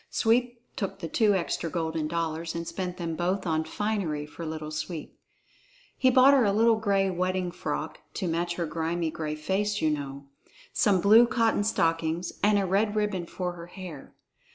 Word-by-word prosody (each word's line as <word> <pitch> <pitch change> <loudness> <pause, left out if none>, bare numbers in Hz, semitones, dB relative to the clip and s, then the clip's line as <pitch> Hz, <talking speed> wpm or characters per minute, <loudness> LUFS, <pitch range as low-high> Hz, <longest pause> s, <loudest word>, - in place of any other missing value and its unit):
Sweep 240 +1 +1 0.2
took 195 -1 -3
the 180 -4 -5
two 210 +4 +3
extra 170 -2 -1
golden 160 -2 -2
dollars 165 0 -2
and 170 0 -4
spent 180 -1 -4
them 165 -3 -3
both 185 +4 -1
on 160 -2 +1
finery 185 -7 -2
for 160 +2 -8
Little 155 -1 -5
Sweep. 155 +1 -5 0.8
He 260 - +3
bought 255 +2 +7
her 270 -3 +5
a 205 - +3
little 225 +2 +4
gray 200 -3 +1
wedding 185 0 -1
frock - - -4 0.2
(to 190 - -2
match 170 +1 -1
her 170 - -1
grimy, 165 +1 -2
gray 155 -1 -4
face, 200 +7 -1
you 155 - +2
know), 140 -1 -5 0.5
some 195 -4 +3
blue 220 +5 +7
cotton 230 -3 +2
stockings, 165 -3 0
and 210 +1 +4
a 200 - +1
red 205 +3 +1
ribbon 205 -5 -1
for 180 0 -3
her 170 -1 -10
hair. 175 -5 -10
180 Hz, 175 wpm, -27 LUFS, 165-205 Hz, 0.8 s, bought